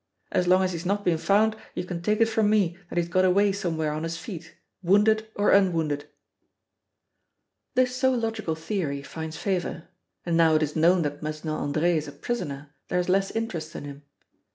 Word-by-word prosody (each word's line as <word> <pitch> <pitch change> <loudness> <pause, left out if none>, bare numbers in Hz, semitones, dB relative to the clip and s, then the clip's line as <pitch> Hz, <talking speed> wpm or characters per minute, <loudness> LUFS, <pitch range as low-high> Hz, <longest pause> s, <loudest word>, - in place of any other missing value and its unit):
As 180 - +1
long 185 +1 +5
as 185 - 0
he's 165 -1 -5
not 200 +2 -1
been 165 -3 +2
found 215 +5 +3 0.2
you - - -3
can 175 -2 -5
take 210 +4 +1
it - - +7
from 225 -2 +1
me 200 -6 +2
that - - -6
he's 170 -1 +1
got 185 +2 +2
away 195 +2 +4
somewhere 160 -5 -2
on 155 +1 -3
his 165 0 -3
feet, 170 -1 -8 0.3
wounded 210 +4 +3
or 205 - +2
unwounded." 165 -7 +2 1.7
This 255 0 +2
so 260 0 +3
logical 225 -8 -2
theory 160 -4 -3
finds 160 +1 -6
favor, 180 -4 -3 0.4
and 170 -1 0
now 165 -1 +5
it 155 - +3
is 150 0 -3
known 170 +2 +4
that 145 -1 -4
Mesnil 155 0 -4
Andre 155 +4 +1
is 155 - -3
a - - -7
prisoner 145 -5 -5
there 180 - -1
is 180 - -2
less 195 +1 +2
interest 170 -8 -4
in - - -6
him. 140 0 -9
175 Hz, 195 wpm, -26 LUFS, 160-205 Hz, 1.7 s, it